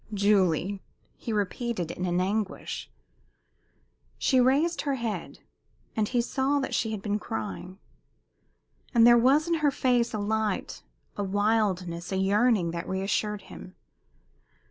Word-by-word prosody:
"Julie!" 195 -2 +2 0.3
he 230 - -6
repeated, 210 -3 -2
in 185 - -4
an 175 0 +1
anguish. 200 +2 -2 1.3
She 260 - +3
raised 290 +7 +2
her 280 -2 -1
head, 230 -4 -5 0.5
and 215 -1 +1
he 245 +1 +1
saw 265 +4 0
that 270 - -3
she 225 - 0
had 215 -3 -5
been 210 0 -1
crying. 110 - -5 1.2
But 230 - +6
there 240 0 +8
was 270 +7 +4
in 340 - +1
her 295 - +4
face 250 -3 +1
a 215 - -3
light, 215 -1 -2 0.4
a 205 - -1
wildness, 195 -4 0
a 190 - 0
yearning 200 -1 +2
that 170 0 -5
reassured 195 +2 -1
him. 185 - -11
210 Hz, 135 wpm, -27 LUFS, 190-240 Hz, 1.3 s, there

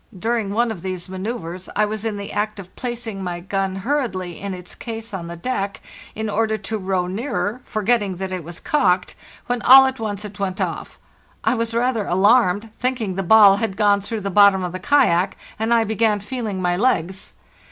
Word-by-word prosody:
During 225 +1 -1
one 230 +3 +1
of 195 -6 -7
these 185 -1 -4
manceuvres 185 -2 -5
I 210 - +3
"was 215 0 -4
in 220 -2 -2
the 200 0 -6
act 210 0 -2
of 185 -1 -11
placing 235 -5 -5
my 175 -1 -3
gun 195 +1 -2
hurriedly 215 - -2
in 200 0 -4
its 180 0 -10
case 225 -1 -7
on 175 -3 -5
the 170 - -6
deck, 200 0 -3 0.4
in 220 0 -3
order 220 +1 0
to 215 +2 -4
row 185 -2 -1
nearer, 220 +3 -3
forgetting 215 -3 0
that 190 +1 -5
it 185 -2 -4
was 170 +2 -8
cocked, 185 -11 +1 0.3
when 245 -1 -2
all 265 +1 +9
at 265 0 -2
once 210 -2 -4
it 205 0 -9
went 190 -1 -2
off. - - -4 0.5
I - - +2
was 230 -1 -2
rather 235 -3 0
alarmed, 205 +2 +3
thinking 245 -6 -1
the 195 - -2
ball 200 +1 +7
had 200 -3 -2
gone 205 -2 +3
through 215 +2 -4
the 200 0 -3
bottom 200 -1 +5
of 180 - -3
the 185 - -5
kayak, 195 -10 +2 0.2
and 220 +1 -1
I 230 -1 +4
began 220 -1 +1
feeling 215 -2 -4
my 175 0 +2
legs. 190 -4 -1
205 Hz, 200 wpm, -21 LUFS, 190-230 Hz, 0.5 s, all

